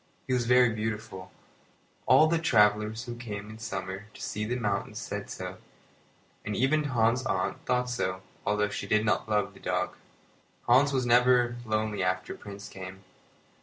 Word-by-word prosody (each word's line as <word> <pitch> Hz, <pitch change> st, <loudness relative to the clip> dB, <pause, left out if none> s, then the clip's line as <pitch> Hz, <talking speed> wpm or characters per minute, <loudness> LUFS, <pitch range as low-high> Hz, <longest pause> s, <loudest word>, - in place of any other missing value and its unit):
He -, -, -1 dB
was 120 Hz, -2 st, +1 dB
very 125 Hz, -1 st, +6 dB
beautiful. 110 Hz, -4 st, -4 dB, 0.8 s
All 155 Hz, -, +7 dB
the 165 Hz, +1 st, +2 dB
travellers 105 Hz, -5 st, +3 dB
who 120 Hz, -1 st, -6 dB
came 105 Hz, -3 st, -6 dB
in 110 Hz, -, -10 dB
the -, -, -15 dB
summer 95 Hz, -2 st, -5 dB
to -, -, -12 dB
see 105 Hz, +1 st, -3 dB
the 120 Hz, +3 st, -1 dB
mountains 105 Hz, -5 st, -2 dB
said -, -, -5 dB
so, -, -, -6 dB, 0.9 s
and 105 Hz, 0 st, -3 dB
even 150 Hz, +6 st, +2 dB
Hans's 120 Hz, -1 st, +2 dB
aunt 95 Hz, -4 st, -1 dB
thought 125 Hz, 0 st, +1 dB
so, 95 Hz, -7 st, -2 dB, 0.2 s
although 105 Hz, 0 st, +1 dB
she 105 Hz, -, -5 dB
did 110 Hz, 0 st, +2 dB
not 110 Hz, -, +1 dB
love 105 Hz, -1 st, +1 dB
the -, -, -15 dB
dog. -, -, -1 dB, 0.7 s
Hans 130 Hz, +4 st, +5 dB
was 130 Hz, -2 st, 0 dB
never 120 Hz, 0 st, +4 dB
lonely 110 Hz, -2 st, -1 dB
after 90 Hz, 0 st, -1 dB
Prince 100 Hz, 0 st, -9 dB
came. 95 Hz, -1 st, -9 dB
110 Hz, 165 wpm, -29 LUFS, 100-125 Hz, 0.9 s, All